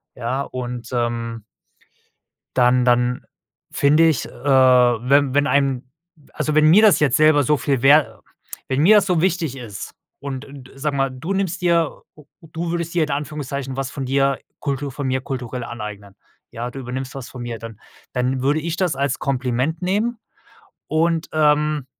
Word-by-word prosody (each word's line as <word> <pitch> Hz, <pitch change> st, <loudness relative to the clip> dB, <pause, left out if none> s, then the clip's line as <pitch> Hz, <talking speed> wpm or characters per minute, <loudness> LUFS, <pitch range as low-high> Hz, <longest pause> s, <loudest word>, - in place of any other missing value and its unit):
Ja 125 Hz, +4 st, -2 dB
und, 125 Hz, -3 st, -6 dB
ähm 115 Hz, -2 st, -2 dB, 1.1 s
dann 125 Hz, 0 st, +3 dB
dann 125 Hz, 0 st, +2 dB, 0.5 s
finde 150 Hz, +4 st, +4 dB
ich, 155 Hz, -6 st, 0 dB
äh, -, -, -13 dB
wenn 130 Hz, 0 st, +3 dB
wenn 145 Hz, +1 st, +2 dB
einem 140 Hz, -3 st, +1 dB, 0.5 s
also, 155 Hz, -, -2 dB
wenn 155 Hz, 0 st, +5 dB
mir 180 Hz, +7 st, +7 dB
das 210 Hz, -7 st, +5 dB
jetzt 145 Hz, -5 st, +3 dB
selber 155 Hz, -1 st, +5 dB
so 150 Hz, +3 st, +2 dB
viel 135 Hz, -3 st, -1 dB
wer 145 Hz, +3 st, +4 dB, 0.5 s
wenn 130 Hz, +2 st, 0 dB
mir 200 Hz, +7 st, +6 dB
das 205 Hz, -, +3 dB
so 180 Hz, -4 st, +1 dB
wichtig 165 Hz, -6 st, 0 dB
ist 110 Hz, -6 st, -8 dB, 0.3 s
und 140 Hz, -1 st, -6 dB
d 135 Hz, -2 st, -12 dB
sag 145 Hz, +2 st, -2 dB
mal, 135 Hz, -1 st, +1 dB
du 150 Hz, +9 st, -4 dB
nimmst 185 Hz, -2 st, -2 dB
dir 170 Hz, -2 st, +1 dB
o 150 Hz, -, -17 dB, 0.2 s
u 165 Hz, -, -15 dB
du 165 Hz, +1 st, -3 dB
würdest 170 Hz, -1 st, -3 dB
dir 170 Hz, -2 st, +2 dB
in 150 Hz, -, -3 dB
Anführungszeichen 140 Hz, -2 st, -4 dB
was 135 Hz, -1 st, -3 dB
von 135 Hz, -2 st, -5 dB
dir 135 Hz, +1 st, +1 dB, 0.2 s
Kultur 140 Hz, -1 st, -3 dB
von 135 Hz, +1 st, -4 dB
mir 130 Hz, 0 st, 0 dB
kulturell 125 Hz, -2 st, -5 dB
aneignen. 105 Hz, -4 st, -8 dB, 0.4 s
Ja, 120 Hz, +2 st, -5 dB
du 135 Hz, -, -8 dB
übernimmst 130 Hz, +1 st, -5 dB
was 135 Hz, -3 st, -7 dB
von 125 Hz, -, -9 dB
mir, 120 Hz, -1 st, -5 dB
dann 115 Hz, -2 st, -10 dB, 0.3 s
dann 125 Hz, +1 st, -1 dB
würde 145 Hz, +4 st, +1 dB
ich 165 Hz, +1 st, -4 dB
das 180 Hz, -6 st, 0 dB
als 140 Hz, 0 st, -1 dB
Kompliment 135 Hz, +3 st, -1 dB
nehmen 210 Hz, +6 st, -1 dB, 0.7 s
und, 165 Hz, +1 st, 0 dB
ähm, 150 Hz, -2 st, +2 dB
140 Hz, 175 wpm, -21 LUFS, 125-155 Hz, 1.1 s, mir